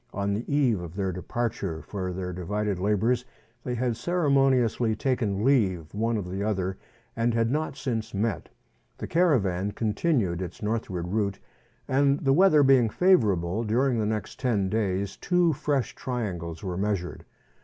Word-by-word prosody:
On 100 0 0
the 110 +7 -4
eve 130 -9 +2
of 85 0 -8
their 95 -2 -1
departure 90 -3 -3
for 95 +2 -4
their 90 0 -4
divided 100 +2 -2
labours, 110 +5 +1 0.4
they 125 - -2
had 120 -1 0
ceremoniously 135 -8 +2
taken 110 -4 -1
leave 95 - +2
one 115 +2 0
of 100 -4 -4
the 95 +2 -4
other, 95 -3 -2 0.4
and 115 0 +1
had 115 0 +1
not 155 +2 -2
since 110 -4 -3
met. 105 -2 -2 0.5
The - - -5
caravan 105 - +1
continued 105 - 0
its 90 +3 -7
northward 100 -5 -2
route, 100 0 -1 0.5
and 140 +1 +3
the 135 -1 +2
weather 160 -2 +5
being 130 -4 +5
favourable, 105 - +2
during 120 +3 +1
the 105 - 0
next 105 -2 -4
ten 105 -7 +1
days 100 -2 -1
two 180 -2 +2
fresh 145 -3 -1
triangles 90 -10 -4
were 90 -2 -3
measured. 100 -3 -2
110 Hz, 155 wpm, -26 LUFS, 95-130 Hz, 0.5 s, weather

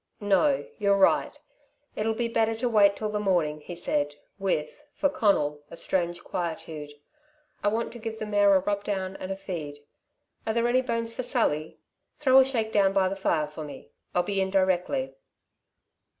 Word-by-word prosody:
"No. 205 +8 +2
You're 200 -1 +3
right. 195 - +3 0.6
It'll 220 +1 0
be 235 +1 0
better 225 -1 +1
to 240 +3 -1
wait 205 -3 +5
till 215 +1 -3
the 210 - -1
morning," 170 -7 +1
he 175 +4 -8
said, 145 -4 -1 0.2
with, 190 - -2
for 285 - +2
Conal, 150 - +1
a 170 - -9
strange 175 -2 -1
quietude. 160 -4 -5 0.7
"I - - +2
want 225 +3 0
to 240 - -9
give 220 0 -5
the 215 - -4
mare 205 -1 +4
a 190 - +4
rub 200 +1 -1
down 190 -2 -3
and 185 - -6
a - - -1
feed. 170 -7 -6 0.7
Are 220 - +1
there 235 0 +2
any 250 +2 +3
bones 230 -2 -2
for 255 - -3
Sally? 225 - 0 0.4
Throw 265 -2 +6
a - - +8
shakedown 220 -6 +1
by 190 -1 +3
the 195 - -3
fire 165 -5 +1
for 150 +1 -8
me. 150 - -10 0.2
I'll 180 - +3
be 195 0 -1
in 190 - 0
directly." 190 +8 +1
200 Hz, 180 wpm, -27 LUFS, 175-225 Hz, 0.7 s, a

